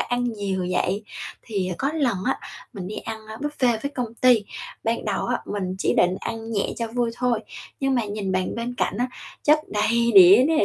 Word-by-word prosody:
ăn 245 Hz, 0 st, 0 dB
nhiều 200 Hz, -5 st, -2 dB
vậy. 185 Hz, +3 st, 0 dB, 0.4 s
Thì 195 Hz, -4 st, -2 dB
có 275 Hz, -, 0 dB
lần 270 Hz, -9 st, +1 dB
á 265 Hz, -, +1 dB, 0.3 s
mình 195 Hz, -6 st, -6 dB
đi 205 Hz, -, -6 dB
ăn, 220 Hz, -1 st, -6 dB
ơ, 220 Hz, 0 st, -8 dB
buffet 255 Hz, -4 st, 0 dB
với 280 Hz, -, -2 dB
công 235 Hz, -3 st, -3 dB
ty, 240 Hz, -4 st, +4 dB, 0.4 s
ban 230 Hz, +1 st, 0 dB
đầu 205 Hz, -3 st, -1 dB
á, -, -, 0 dB
mình 190 Hz, -3 st, -3 dB
chỉ -, -, +1 dB
định 180 Hz, +1 st, +3 dB
ăn 225 Hz, 0 st, -5 dB
nhẹ 200 Hz, -3 st, +1 dB
cho 230 Hz, -, -2 dB
vui 240 Hz, 0 st, 0 dB
thôi, 245 Hz, -3 st, +1 dB, 0.4 s
nhưng 270 Hz, -1 st, +2 dB
mà 240 Hz, -3 st, +1 dB
nhìn 205 Hz, -2 st, -3 dB
bàn 185 Hz, 0 st, 0 dB
bên 235 Hz, +2 st, -3 dB
cạnh 200 Hz, -, 0 dB
á, 245 Hz, -, +2 dB, 0.4 s
chất 300 Hz, +1 st, +6 dB
đầy 235 Hz, +3 st, +2 dB
đĩa 195 Hz, +5 st, +9 dB
nè, 320 Hz, -1 st, +3 dB
225 Hz, 210 wpm, -24 LUFS, 200-245 Hz, 0.4 s, đĩa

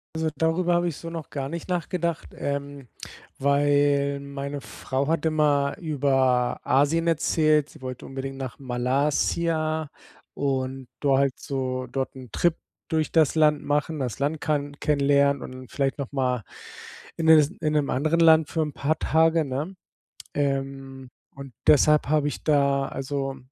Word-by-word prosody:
Also, 160 Hz, 0 st, 0 dB
darüber 170 Hz, +3 st, +1 dB
habe 175 Hz, 0 st, +1 dB
ich 165 Hz, -, -3 dB
so 165 Hz, -, -8 dB
noch 165 Hz, -3 st, -7 dB
gar 135 Hz, -1 st, -4 dB
nicht 170 Hz, +2 st, -6 dB
nachgedacht, 175 Hz, -2 st, -2 dB
ähm, 140 Hz, -1 st, -4 dB, 0.5 s
weil 140 Hz, 0 st, +2 dB
meine 140 Hz, 0 st, -6 dB
Frau 130 Hz, +5 st, -3 dB
hat 165 Hz, -1 st, 0 dB
immer 150 Hz, -3 st, +2 dB
über 135 Hz, -7 st, +1 dB
Asien 145 Hz, +5 st, +2 dB
erzählt, 155 Hz, -2 st, +2 dB
sie 155 Hz, -, -16 dB
wollte 130 Hz, -1 st, -7 dB
unbedingt 135 Hz, 0 st, -6 dB
nach 130 Hz, -3 st, -6 dB
Malaysia 150 Hz, +5 st, 0 dB, 0.4 s
und 130 Hz, -2 st, -2 dB
do 140 Hz, -2 st, +3 dB
halt 140 Hz, -1 st, +1 dB
so 130 Hz, -2 st, -3 dB
dort 135 Hz, -1 st, -3 dB
‘n 130 Hz, -2 st, -10 dB
Trip 170 Hz, -2 st, +2 dB, 0.3 s
durch 160 Hz, -1 st, -1 dB
das 160 Hz, -3 st, +3 dB
Land 150 Hz, -2 st, +3 dB
machen, 150 Hz, +2 st, -1 dB
das 125 Hz, -4 st, -3 dB
Land 145 Hz, +3 st, -1 dB
kann 145 Hz, -2 st, -2 dB
kennenlernen 140 Hz, -1 st, +2 dB
und 130 Hz, -1 st, -9 dB
vielleicht 135 Hz, -2 st, -1 dB
nochmal 130 Hz, -4 st, -1 dB, 0.7 s
in 160 Hz, -, -1 dB
es 155 Hz, -2 st, +7 dB
in 155 Hz, 0 st, 0 dB
‘nem 150 Hz, -2 st, +1 dB
anderen 155 Hz, +6 st, +1 dB
Land 160 Hz, -2 st, +6 dB
für 165 Hz, -, -1 dB
‘n 150 Hz, -1 st, -1 dB
paar 150 Hz, +4 st, -1 dB
Tage, 160 Hz, +1 st, +3 dB
ne? 145 Hz, +8 st, -4 dB, 0.6 s
Ähm, 135 Hz, -2 st, -3 dB, 0.2 s
und 135 Hz, -2 st, -10 dB
deshalb 150 Hz, 0 st, +5 dB
habe 150 Hz, -1 st, +2 dB
ich 145 Hz, -, -5 dB
da 140 Hz, -2 st, +2 dB
also 135 Hz, 0 st, -4 dB
140 Hz, 150 wpm, -25 LUFS, 135-155 Hz, 0.7 s, es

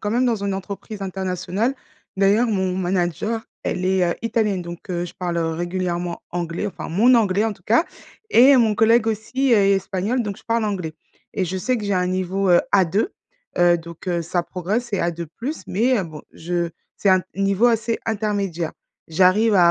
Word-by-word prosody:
quand 205 Hz, -, -2 dB
même 245 Hz, +3 st, +2 dB
dans 225 Hz, -4 st, 0 dB
une 200 Hz, -1 st, -1 dB
entreprise 200 Hz, +2 st, -6 dB
internationale. 190 Hz, +5 st, -2 dB, 0.4 s
D'ailleurs, 205 Hz, +5 st, +3 dB
mon 190 Hz, -3 st, 0 dB
manager, 185 Hz, +4 st, -1 dB, 0.2 s
elle 180 Hz, -, -2 dB
est, 185 Hz, -1 st, +2 dB
heu, -, -, -1 dB
italienne, 215 Hz, -5 st, 0 dB
donc, 170 Hz, 0 st, -9 dB
heu, 175 Hz, 0 st, -1 dB
je 175 Hz, -, -9 dB
parle 175 Hz, -2 st, -2 dB
régulièrement 175 Hz, +1 st, -2 dB
anglais, 175 Hz, +2 st, -3 dB
enfin 200 Hz, -, -6 dB
mon 225 Hz, +9 st, +4 dB
anglais, 210 Hz, -3 st, +3 dB
en 225 Hz, -, 0 dB
tout 180 Hz, -, -18 dB
cas. 235 Hz, +10 st, +3 dB, 0.5 s
Et 265 Hz, -, +7 dB
mon 225 Hz, -3 st, +3 dB
collègue 225 Hz, +1 st, +4 dB
aussi 240 Hz, +5 st, 0 dB
est 200 Hz, -3 st, +5 dB
est 195 Hz, -, +4 dB
espagnol, 195 Hz, +6 st, -1 dB
donc 205 Hz, -3 st, -4 dB
je -, -, -20 dB
parle 230 Hz, -1 st, 0 dB
anglais. 180 Hz, -7 st, -3 dB, 0.4 s
Et 190 Hz, -, 0 dB
je 185 Hz, +2 st, -3 dB
sais 250 Hz, +7 st, 0 dB
que 210 Hz, -, -5 dB
j'ai 200 Hz, -, 0 dB
un 180 Hz, 0 st, +1 dB
niveau, 185 Hz, +1 st, -1 dB
heu, 175 Hz, -, +6 dB
A2, 195 Hz, -, +3 dB, 0.5 s
heu, 175 Hz, 0 st, +5 dB
donc, 170 Hz, +2 st, -11 dB
heu, 170 Hz, -1 st, 0 dB
ça 175 Hz, +1 st, -1 dB
progresse. 195 Hz, +8 st, -2 dB
C'est 200 Hz, -, -1 dB
A2+, 170 Hz, -1 st, -2 dB, 0.4 s
mais, 235 Hz, +5 st, +2 dB
heu, 190 Hz, -, -1 dB
bon, 155 Hz, -2 st, -9 dB
je 170 Hz, 0 st, -2 dB, 0.3 s
c'est 200 Hz, -, 0 dB
un 185 Hz, -1 st, +5 dB
niveau 195 Hz, +4 st, +2 dB
assez 230 Hz, 0 st, +1 dB
intermédiaire. 200 Hz, -6 st, -2 dB, 0.4 s
J'arrive 190 Hz, +6 st, +4 dB
à 175 Hz, -2 st, +6 dB
195 Hz, 190 wpm, -22 LUFS, 175-220 Hz, 0.5 s, Et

